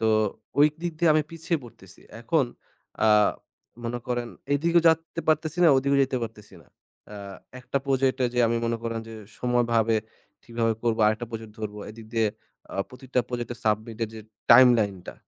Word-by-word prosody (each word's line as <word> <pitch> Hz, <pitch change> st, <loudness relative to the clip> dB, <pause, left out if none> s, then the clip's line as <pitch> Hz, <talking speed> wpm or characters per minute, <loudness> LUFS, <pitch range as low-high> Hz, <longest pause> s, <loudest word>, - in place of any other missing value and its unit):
তো 110 Hz, -, +1 dB, 0.5 s
ওই 145 Hz, -, +8 dB
দিক 175 Hz, -1 st, -2 dB
দিয়ে 170 Hz, -1 st, +4 dB
আমি 155 Hz, -, +3 dB
পিছিয়ে 165 Hz, 0 st, -2 dB
পড়তেছি। 95 Hz, -5 st, -15 dB, 0.2 s
এখন 155 Hz, +4 st, +2 dB, 0.6 s
আ -, -, +5 dB, 0.8 s
মনে 120 Hz, +1 st, -2 dB
করেন 120 Hz, -1 st, -2 dB, 0.2 s
এই 145 Hz, -, +3 dB
দিকেও 170 Hz, 0 st, +4 dB
যেতে 165 Hz, +1 st, 0 dB
পারতেছি 155 Hz, +2 st, +1 dB
না, 170 Hz, -, +7 dB
ওই 130 Hz, -, +4 dB
দিকেও 140 Hz, 0 st, +3 dB
যেতে 130 Hz, 0 st, -3 dB
পারতেছি 110 Hz, -2 st, -8 dB
না। -, -, -27 dB, 0.5 s
আ -, -, -8 dB, 0.5 s
একটা 125 Hz, +2 st, -4 dB
প্রজেক্টে 130 Hz, -1 st, +1 dB
যে -, -, -1 dB
আমি 115 Hz, +1 st, +1 dB
মনে 115 Hz, 0 st, 0 dB
করেন 115 Hz, -1 st, -3 dB
যে 115 Hz, -, -9 dB, 0.2 s
সময়ভাবে 115 Hz, -2 st, +2 dB, 0.5 s
ঠিকভাবে 115 Hz, -1 st, 0 dB
করবো, 115 Hz, -2 st, +1 dB
আরেকটা 110 Hz, +2 st, 0 dB
প্রজেক্ট 110 Hz, -1 st, -7 dB
ধরবো, 105 Hz, -1 st, -5 dB
এদিক 110 Hz, 0 st, -12 dB
দিয়ে 115 Hz, -1 st, +3 dB, 0.5 s
আ -, -, -7 dB
প্রতিটা 125 Hz, 0 st, -2 dB
প্রজেক্টের 120 Hz, -1 st, -4 dB
submit 110 Hz, +1 st, -1 dB
এর -, -, -7 dB
যে 110 Hz, -, -8 dB, 0.3 s
timeline 115 Hz, -7 st, +6 dB
টা, -, -, -7 dB
120 Hz, 175 wpm, -26 LUFS, 115-140 Hz, 0.8 s, ওই